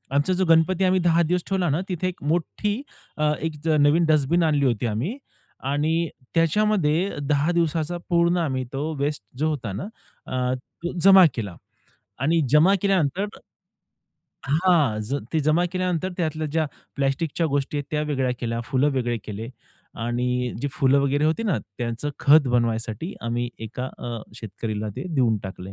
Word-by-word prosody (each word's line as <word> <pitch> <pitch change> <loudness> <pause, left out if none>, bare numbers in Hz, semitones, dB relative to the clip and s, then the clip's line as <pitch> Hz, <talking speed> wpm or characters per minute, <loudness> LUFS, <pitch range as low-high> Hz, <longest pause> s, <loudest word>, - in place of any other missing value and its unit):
आमचा 145 +6 +2
जो 185 +1 +1
गणपती 165 +3 +3
आम्ही 185 0 +3
10 170 -1 +3
दिवस 175 +2 0
ठेवला 190 -3 +1
ना 150 +5 +1
तिथे 185 0 -1
एक 185 - -6
मोठी, 175 +6 0 0.7
एक 160 0 -3
ज - - -4
नवीन 145 +4 +4
डस्टबिन 155 +2 +3
आणली 150 -3 +2
होती 120 -2 +1
आम्ही. 120 - -2 0.5
आणि 155 +4 +1 0.3
त्याच्यामध्ये 175 0 +2 0.2
10 150 +3 +2
दिवसाचा 170 0 0
पूर्ण 170 0 +3
आम्ही 135 -7 -1
तो 145 +4 -2
वेस्ट 145 -3 -2
जो 155 +3 +1
होता 130 -9 -3
ना, 105 +9 -4 0.4
अ, 125 0 -1
तो 170 +6 -8
जमा 195 -1 +9
केला 100 -7 -5 0.6
आणि 160 +5 +2
जमा 155 +8 +5
केल्यानंतर 190 -2 +1 1.2
हां. 155 -6 +3
ज 115 +6 -3 0.2
ते 160 - +2
जमा 155 +4 +2
केल्यानंतर 185 -1 -1
त्यातल्या 155 -2 -1
ज्या 155 +1 0 0.3
प्लास्टिकच्या 140 +4 0
गोष्टी 145 0 -1
आहेत 145 - -3
त्या 150 -1 0
वेगळ्या 135 -4 0
केल्या, 115 -1 -2
फुलं 140 +2 +1
वेगळे 120 -3 0
केले 110 +2 -6 0.6
आणि 125 +1 -1
जी 145 - -1
फुलं 140 -4 +3
वगैरे 140 +2 +1
होती 160 +8 +1
ना, 195 - +1 0.2
त्याचं 120 +4 -3
खत 145 0 +6
बनवायसाठी 115 - -1
आम्ही 120 +1 -1
एका 115 +3 -5
अ, 120 -1 -5 0.2
शेतकरीला 110 -1 -5
ते - - -4
देऊन 120 -5 +3
टाकले. 95 0 -8
150 Hz, 160 wpm, -24 LUFS, 125-170 Hz, 1.2 s, जमा